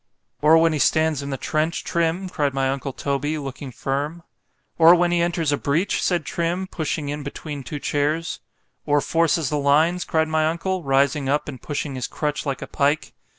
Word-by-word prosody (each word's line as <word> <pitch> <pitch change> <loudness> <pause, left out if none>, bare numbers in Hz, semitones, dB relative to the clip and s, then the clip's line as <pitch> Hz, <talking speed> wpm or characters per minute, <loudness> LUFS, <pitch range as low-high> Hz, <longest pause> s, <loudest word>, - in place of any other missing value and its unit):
——Or 155 +2 +6
when 165 0 +4
he 150 - -1
stands 155 -1 +2
in 140 - -5
the 135 - -3
trench, 155 +5 -1
Trim? 170 +3 0
cried 145 -6 -1
my 135 -1 +1
uncle 135 0 -3
Toby, 140 +3 -2
looking 135 -1 -6
firm.——Or 150 +5 +1
when 175 0 +2
he 175 -1 +2
enters 170 -3 0
a 145 - +1
breach? 165 +9 0
said 175 -4 0
Trim, 175 +2 -1
pushing 155 -4 -3
in 145 +1 -3
between 145 +1 -6
two 145 +3 -6
chairs.——Or 145 0 -2
forces 165 -1 +1
the 150 - 0
lines? 155 +5 +3
cried 160 0 +1
my 155 0 +1
uncle, 180 +3 -1
rising 140 0 +1
up, 145 +2 0
and 130 -5 -7
pushing 145 -1 -3
his 130 -1 -3
crutch 150 0 -3
like 135 -2 -2
a - - -7
pike. 145 +2 0
150 Hz, 185 wpm, -23 LUFS, 140-165 Hz, -, Or